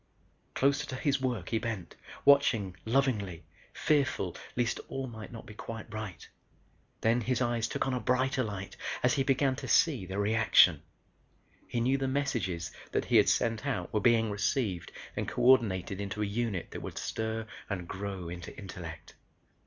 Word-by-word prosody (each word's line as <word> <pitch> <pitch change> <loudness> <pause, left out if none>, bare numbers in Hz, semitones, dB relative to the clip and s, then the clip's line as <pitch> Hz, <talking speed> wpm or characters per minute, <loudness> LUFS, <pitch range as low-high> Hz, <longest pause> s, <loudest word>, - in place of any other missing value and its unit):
Closer 140 +2 +2
to 130 - -4
his 140 0 +1
work 120 -9 -1
he 115 - +1
bent, 110 -6 -4 0.3
watching 125 -10 +5
lovingly, 110 - +1 0.3
fearful 135 - +1 0.2
least 120 -1 0
all 135 0 -3
might 110 -4 -8
not 115 -2 -9
be 110 - -10
quite 110 0 -7
right. 110 -6 -6 0.7
Then 115 +2 +3
his 125 +2 0
eyes 120 -2 +1
took - - -1
on 135 - 0
a 125 - 0
brighter 130 +2 +1
light 100 -3 -5 0.3
as 125 - +4
he 140 - +1
began 135 0 +2
to - - -6
see 130 - +3
the 95 +2 -4
reaction. 105 -6 +5 0.9
He 120 - -2
knew 130 +3 +2
the 135 - 0
messages 115 - -1 0.2
that - - 0
he - - +4
had - - +6
sent 115 +3 +1
out 105 -11 -2
were 105 - +3
being 115 -1 +4
received 100 -3 -1 0.2
and - - -2
coordinated 100 -7 +3
into 100 +1 -2
a - - +1
unit 105 -3 -2
that - - -6
would - - -7
stir 110 0 -2 0.2
and 90 -3 -3
grow 95 -2 -5
into 85 +1 -7
intellect. 85 -4 -8
115 Hz, 170 wpm, -31 LUFS, 100-130 Hz, 0.9 s, had